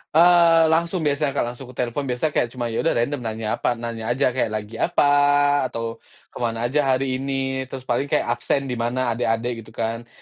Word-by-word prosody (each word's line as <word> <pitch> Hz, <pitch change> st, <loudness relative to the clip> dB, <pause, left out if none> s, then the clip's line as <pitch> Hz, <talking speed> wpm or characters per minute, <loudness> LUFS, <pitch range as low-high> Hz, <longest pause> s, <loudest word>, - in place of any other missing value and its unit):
Eee, 165 Hz, -1 st, +6 dB
langsung 170 Hz, +1 st, +1 dB
biasa, 145 Hz, -1 st, 0 dB
Kak, -, -, +1 dB
langsungku 125 Hz, 0 st, -11 dB
telepon 125 Hz, +3 st, -2 dB
biasa 125 Hz, +5 st, -1 dB
kayak 125 Hz, -, +1 dB
cuma 120 Hz, -2 st, -3 dB
ya 115 Hz, -, -2 dB
udah 165 Hz, -, +1 dB
random 135 Hz, +5 st, 0 dB
nanya 110 Hz, -2 st, -3 dB
apa, 120 Hz, -, +1 dB
nanya 115 Hz, -1 st, -5 dB
aja 130 Hz, +1 st, +2 dB
kayak, 125 Hz, -1 st, 0 dB
"Lagi 110 Hz, +1 st, -6 dB
apa?" -, -, +2 dB, 0.6 s
Atau, 115 Hz, 0 st, -5 dB, 0.3 s
"Kemana 115 Hz, -1 st, -3 dB
aja 150 Hz, -, +2 dB, 0.2 s
hari 130 Hz, 0 st, -1 dB
ini?" 135 Hz, -1 st, -2 dB
Terus 130 Hz, 0 st, -8 dB
paling 130 Hz, +2 st, -1 dB
kayak -, -, +1 dB
absen 135 Hz, +2 st, -1 dB
di -, -, -1 dB
mana 120 Hz, +1 st, 0 dB
adek-adek 115 Hz, +1 st, -1 dB
gitu 110 Hz, -1 st, -12 dB
kan. 115 Hz, +1 st, -3 dB
125 Hz, 195 wpm, -22 LUFS, 115-140 Hz, 0.6 s, Eee